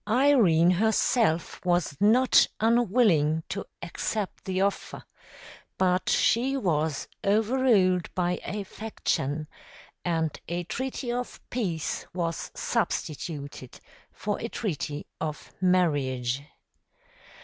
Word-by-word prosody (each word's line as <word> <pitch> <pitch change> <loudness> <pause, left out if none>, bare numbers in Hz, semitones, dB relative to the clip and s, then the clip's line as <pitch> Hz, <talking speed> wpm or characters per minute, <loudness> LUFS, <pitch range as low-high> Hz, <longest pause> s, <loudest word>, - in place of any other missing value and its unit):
Irene 220 - +5
herself 215 -2 +1
was 175 -4 +1
not 240 +5 +5
unwilling 210 -9 +3
to 200 - -4 0.2
accept 195 +4 -3
the 185 -1 -1
offer; 200 0 -2 0.7
but 185 -1 +2
she 265 +4 +2
was 160 - 0 0.2
overruled 210 -4 +3
by 180 -1 0
a 205 +2 -4
faction, 155 -8 -3 0.6
and 160 -3 -1
a 175 +1 -2
treaty 255 - -4
of 245 +1 -4
peace 180 -11 -2
was 170 -2 -2
substituted 145 -4 -3 0.3
for 205 0 -3
a 230 - -4
treaty 150 - -3
of 155 -1 -5
marriage. 140 -9 +1
185 Hz, 95 wpm, -27 LUFS, 160-225 Hz, 0.7 s, Irene